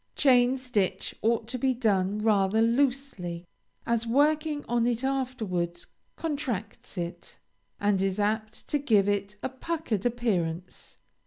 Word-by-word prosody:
Chain 255 -2 +4
stitch 245 -7 -1
ought 225 0 +1
to 255 0 -3
be 260 +1 +2
done 210 -3 +1
rather 205 -1 +3
loosely, 230 -8 0 0.4
as 235 0 0
working 295 +4 +2
on 240 0 +2
it 240 +1 0
afterwards 220 -11 -2 0.3
contracts 250 - -4
it, 170 0 -5 0.4
and 205 -2 +2
is 195 +1 0
apt 215 +1 -1
to 295 - +1
give 215 -8 +3
it 205 0 -1
a - - -1
puckered 260 - -3
appearance. 185 -8 -2
225 Hz, 130 wpm, -28 LUFS, 200-260 Hz, 0.4 s, Chain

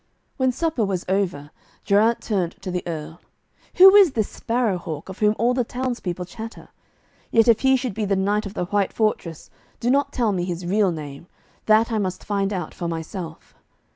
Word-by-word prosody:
When 260 -1 +2
supper 315 -3 -1
was 190 -3 -2
over, 180 -7 -1 0.3
Geraint 215 +3 +3
turned 185 -6 -1
to 185 - -4
the 180 0 -2
Earl. 160 0 -6 0.5
'Who 380 +1 +9
is 395 -8 +7
this 220 -3 0
Sparrow 230 -5 -1
hawk 160 0 -7
of 190 - -9
whom 210 0 +3
all 240 +3 +2
the 250 -1 +1
townspeople 235 -8 -4
chatter? 225 +4 -9 0.6
Yet 225 0 +4
if 230 -2 +5
he 265 0 +4
should 255 -4 -2
be 215 +1 -2
the 200 0 +1
knight 205 +2 0
of 200 - -10
the 180 - -1
white 200 +1 0
fortress, 195 -7 -2 0.3
do 240 +1 +1
not 280 +1 +2
tell 235 -6 +1
me 180 -3 -1
his 175 0 -4
real 195 +1 +2
name. 150 0 -8 0.4
That 220 +2 +4
I 220 - 0
must 185 -3 -3
find 200 -1 -1
out 180 -5 -4
for 175 - -4
myself.' 165 0 -6
205 Hz, 195 wpm, -23 LUFS, 180-230 Hz, 0.6 s, Who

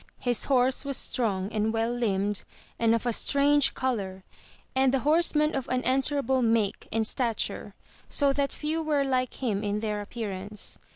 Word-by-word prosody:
His 245 -3 -1
horse 260 -1 +2
was 275 -1 -2
strong 200 -5 -2
and 220 0 0
well 225 +1 0
Hmbed 205 -4 0 0.4
and 230 0 +4
of 230 - -3
a 240 - +1
strange 285 +3 +3
colour, 195 -8 -2 0.5
and 265 0 +4
the 270 -1 +1
horseman 305 +1 +3
of 270 -2 -3
an 255 0 0
an 260 +2 +2
swerable 265 -2 +1
make 225 -3 +1
and 225 0 +1
stature, 230 -1 -2 0.3
so 280 -2 +3
that 280 0 0
few 310 +2 -2
were 300 -3 +1
like 255 -2 0
him 210 -4 0
in 205 0 -1
their 210 -1 -2
appearance. 205 -2 -5
245 Hz, 170 wpm, -27 LUFS, 215-275 Hz, 0.5 s, and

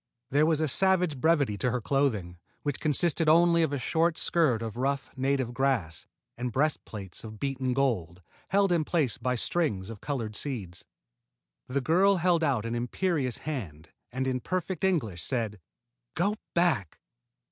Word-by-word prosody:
There 145 +3 +4
was 160 -2 +2
a 155 - +2
savage 180 -2 +2
brevity 145 -11 +2
to 125 - +1
her 125 +1 -1
clothing, 110 -10 0 0.2
which 145 -2 -2
consisted 160 +1 +2
only 170 +1 +5
of 160 -3 +1
a 145 - -1
short 165 +5 +1
skirt 135 -10 +2
of 110 -1 -5
rough 135 +3 -1
native 130 -2 0
grass 125 -12 -1 0.3
and 125 0 -3
breastplates 110 - -2
of 110 -1 -9
beaten 135 -2 -1
gold, 95 -11 -1 0.3
held 195 0 +3
in 170 -3 +3
place 150 -6 0
by 125 +1 0
strings 115 - -1
of 110 - -10
colored 115 -7 -3
seeds. 100 -10 -4 0.8
The 135 +2 -1
girl 185 +8 +4
held 175 -2 +2
out 130 -8 +1
an 115 - -2
imperious 130 +2 -1
hand 85 - -5 0.2
and, 130 +2 -2
in 130 -1 0
perfect 185 +4 -3
English, 125 - 0
said: 110 -1 -2 0.6
"Go 200 +5 +1 0.2
back!" 165 - +1
135 Hz, 160 wpm, -28 LUFS, 115-165 Hz, 0.8 s, only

